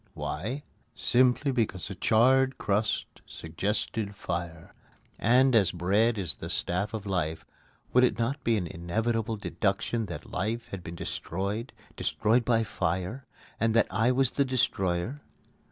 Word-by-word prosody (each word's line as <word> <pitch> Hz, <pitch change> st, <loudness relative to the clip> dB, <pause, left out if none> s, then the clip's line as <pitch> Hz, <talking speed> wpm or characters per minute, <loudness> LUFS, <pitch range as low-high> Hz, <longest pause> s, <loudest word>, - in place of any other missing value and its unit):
Why? 115 Hz, -, -4 dB, 0.3 s
Simply 130 Hz, +3 st, +3 dB
because 110 Hz, -8 st, 0 dB
the 100 Hz, -, -5 dB
charred 130 Hz, +7 st, +3 dB
crust 105 Hz, +2 st, -1 dB
suggested 105 Hz, 0 st, -2 dB
fire; 85 Hz, -3 st, -5 dB, 0.5 s
and, 130 Hz, +4 st, +4 dB
as 100 Hz, -5 st, +4 dB
bread 100 Hz, +6 st, +2 dB
is 85 Hz, -10 st, -3 dB
the -, -, -7 dB
staff 100 Hz, +5 st, -1 dB
of 105 Hz, -2 st, -5 dB
life, 80 Hz, -5 st, -2 dB, 0.5 s
would 125 Hz, -, +6 dB
it 125 Hz, -, +3 dB
not 130 Hz, +5 st, -1 dB
be 115 Hz, -1 st, +2 dB
an 90 Hz, -, -1 dB
inevitable 110 Hz, +7 st, -1 dB
deduction 105 Hz, +2 st, -1 dB
that 80 Hz, -4 st, -8 dB
life 115 Hz, +5 st, -2 dB
had 95 Hz, -3 st, -6 dB
been 85 Hz, 0 st, -7 dB
destroyed 100 Hz, +8 st, -4 dB, 0.2 s
destroyed 115 Hz, +3 st, +1 dB
by 115 Hz, -1 st, +2 dB
fire 95 Hz, +3 st, -2 dB, 0.3 s
and 115 Hz, 0 st, +2 dB
that 115 Hz, -, +5 dB
I 115 Hz, +3 st, +3 dB
was 130 Hz, -1 st, +3 dB
the 140 Hz, -, +2 dB
destroyer? 120 Hz, -2 st, 0 dB
110 Hz, 140 wpm, -28 LUFS, 90-120 Hz, 0.5 s, would